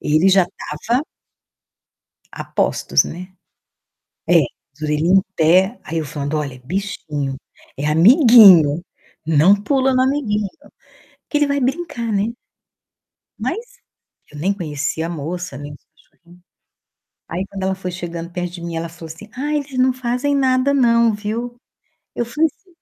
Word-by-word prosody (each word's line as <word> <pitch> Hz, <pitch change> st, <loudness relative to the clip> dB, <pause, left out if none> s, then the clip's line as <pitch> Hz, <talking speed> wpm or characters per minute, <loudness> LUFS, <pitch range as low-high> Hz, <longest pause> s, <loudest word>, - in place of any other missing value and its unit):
Ele 155 Hz, +6 st, +3 dB
já 190 Hz, -2 st, +4 dB, 0.4 s
tava 240 Hz, +4 st, +2 dB, 1.3 s
a -, -, -7 dB
postos, -, -, +2 dB
né. 185 Hz, +2 st, -8 dB, 1.0 s
É, 175 Hz, -1 st, +6 dB, 0.3 s
as 150 Hz, -, -24 dB
orelhinha 155 Hz, +5 st, +2 dB
em 190 Hz, -, +6 dB
pé. 185 Hz, +7 st, +3 dB
Aí 165 Hz, -, -4 dB
eu 160 Hz, -, -2 dB
falando: 145 Hz, +1 st, -3 dB
"Olha, 140 Hz, -4 st, -5 dB
bichinho, 150 Hz, -6 st, -3 dB, 0.4 s
é 145 Hz, -, -3 dB
amiguinho. 185 Hz, -, +7 dB, 0.4 s
Não 160 Hz, +5 st, +5 dB
pula 265 Hz, +5 st, +1 dB
no 255 Hz, -, +3 dB
amiguinho". 230 Hz, -7 st, 0 dB, 0.8 s
Que 295 Hz, -, +1 dB
ele 295 Hz, -, +2 dB
vai 280 Hz, 0 st, 0 dB
brincar, 260 Hz, -4 st, -2 dB
né? 210 Hz, +3 st, 0 dB, 1.1 s
Mas 485 Hz, +2 st, -5 dB, 0.5 s
eu 150 Hz, -, -10 dB
nem 185 Hz, +7 st, +1 dB
conhecia 160 Hz, -3 st, -3 dB
a -, -, -5 dB
moça, 170 Hz, -1 st, -5 dB
nem 145 Hz, 0 st, -8 dB
os 145 Hz, -, -15 dB
cachorrinhos. 175 Hz, +2 st, -23 dB, 0.9 s
Aí 180 Hz, +3 st, -3 dB
quando 195 Hz, -1 st, -7 dB
ela 190 Hz, 0 st, 0 dB
foi 185 Hz, -1 st, -5 dB
chegando 170 Hz, -1 st, -6 dB
perto 175 Hz, 0 st, -4 dB
de 175 Hz, -, -9 dB
mim, 170 Hz, -1 st, -5 dB
ela 165 Hz, +1 st, -3 dB
falou 165 Hz, 0 st, -11 dB
assim: 210 Hz, +6 st, -14 dB
"Ai, 295 Hz, +4 st, -1 dB
eles 275 Hz, -3 st, -6 dB
não 255 Hz, +1 st, +4 dB
fazem 255 Hz, +3 st, -1 dB
nada 260 Hz, 0 st, +2 dB
não, 235 Hz, -4 st, +3 dB
viu?". 225 Hz, +4 st, -4 dB, 0.6 s
Eu 240 Hz, -, -1 dB
falei 300 Hz, +8 st, +1 dB
assim: 380 Hz, -, -32 dB
190 Hz, 150 wpm, -19 LUFS, 165-250 Hz, 1.3 s, amiguinho